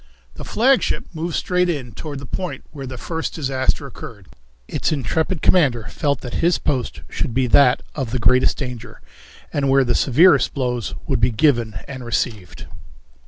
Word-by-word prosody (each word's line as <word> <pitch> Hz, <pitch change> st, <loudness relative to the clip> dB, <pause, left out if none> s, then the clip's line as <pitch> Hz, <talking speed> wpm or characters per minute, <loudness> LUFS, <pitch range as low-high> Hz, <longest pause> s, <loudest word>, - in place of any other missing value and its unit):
The -, -, -9 dB
flagship 260 Hz, +4 st, +2 dB
moved 165 Hz, 0 st, -3 dB
straight 180 Hz, 0 st, +1 dB
in 135 Hz, -8 st, -3 dB
toward 150 Hz, +2 st, -7 dB
the 140 Hz, -, -8 dB
point 180 Hz, +7 st, -5 dB
where 140 Hz, -3 st, -7 dB
the 130 Hz, 0 st, -7 dB
first 160 Hz, +6 st, -4 dB
disaster 135 Hz, -1 st, -1 dB
occurred. 115 Hz, -6 st, -10 dB, 0.4 s
Its -, -, -1 dB
intrepid 155 Hz, -, -1 dB
commander 135 Hz, -11 st, +3 dB
felt 145 Hz, -1 st, -1 dB
that 125 Hz, -, -7 dB
his 170 Hz, +1 st, +3 dB
post 125 Hz, -5 st, -2 dB
should 115 Hz, -, -3 dB
be 130 Hz, 0 st, +2 dB
that 125 Hz, +1 st, +4 dB
of 135 Hz, -5 st, -3 dB
the 125 Hz, -, -1 dB
greatest 125 Hz, +3 st, +3 dB
danger, 125 Hz, -4 st, -6 dB, 0.5 s
and 140 Hz, -1 st, 0 dB
where 135 Hz, 0 st, +5 dB
the 120 Hz, -, +1 dB
severest 145 Hz, +1 st, +4 dB
blows 125 Hz, -5 st, -2 dB
would -, -, 0 dB
be 120 Hz, +2 st, +3 dB
given 120 Hz, -3 st, +2 dB
and 130 Hz, -2 st, -7 dB
received. 110 Hz, -5 st, -3 dB
135 Hz, 165 wpm, -21 LUFS, 120-155 Hz, 0.5 s, where